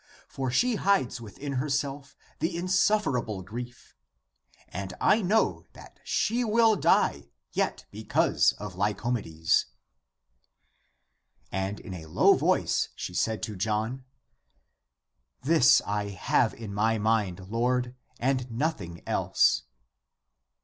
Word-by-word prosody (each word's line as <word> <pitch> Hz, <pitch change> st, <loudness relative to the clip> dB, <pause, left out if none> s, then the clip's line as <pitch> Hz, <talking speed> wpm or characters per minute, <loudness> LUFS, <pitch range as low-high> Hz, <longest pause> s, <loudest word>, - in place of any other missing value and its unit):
For 135 Hz, -1 st, -3 dB
she 235 Hz, -, +2 dB
hides 140 Hz, -13 st, +1 dB
within 125 Hz, +6 st, -7 dB
herself 140 Hz, 0 st, -2 dB, 0.2 s
the 170 Hz, +1 st, -1 dB
insufferable 175 Hz, -, +1 dB
grief. 120 Hz, +5 st, -9 dB, 0.7 s
And 95 Hz, +1 st, -6 dB
I 220 Hz, -, +4 dB
know 210 Hz, +4 st, +1 dB
that -, -, -15 dB
she 240 Hz, +3 st, 0 dB
will 225 Hz, 0 st, +4 dB
die -, -, +2 dB, 0.2 s
yet -, -, -1 dB
because -, -, +2 dB
of 105 Hz, -2 st, -8 dB
Lyco 105 Hz, +5 st, -1 dB
medes." 80 Hz, -8 st, 0 dB, 1.8 s
And 95 Hz, +2 st, -2 dB
in 95 Hz, -, -9 dB
a 80 Hz, -3 st, -8 dB
low 80 Hz, -, +5 dB
voice -, -, +1 dB
she -, -, -6 dB
said 110 Hz, -4 st, -1 dB
to 105 Hz, +2 st, -4 dB
John, 110 Hz, +6 st, -2 dB, 0.7 s
" -, -, -52 dB
This 150 Hz, -3 st, +5 dB
I 105 Hz, 0 st, -1 dB
have 100 Hz, +2 st, 0 dB
in 110 Hz, -3 st, -8 dB
my 110 Hz, +2 st, +1 dB
mind, 105 Hz, -4 st, 0 dB
Lord, 125 Hz, +1 st, 0 dB, 0.3 s
and 130 Hz, 0 st, 0 dB
nothing 115 Hz, -, -3 dB
else." 65 Hz, -, +2 dB
120 Hz, 115 wpm, -27 LUFS, 100-145 Hz, 1.8 s, low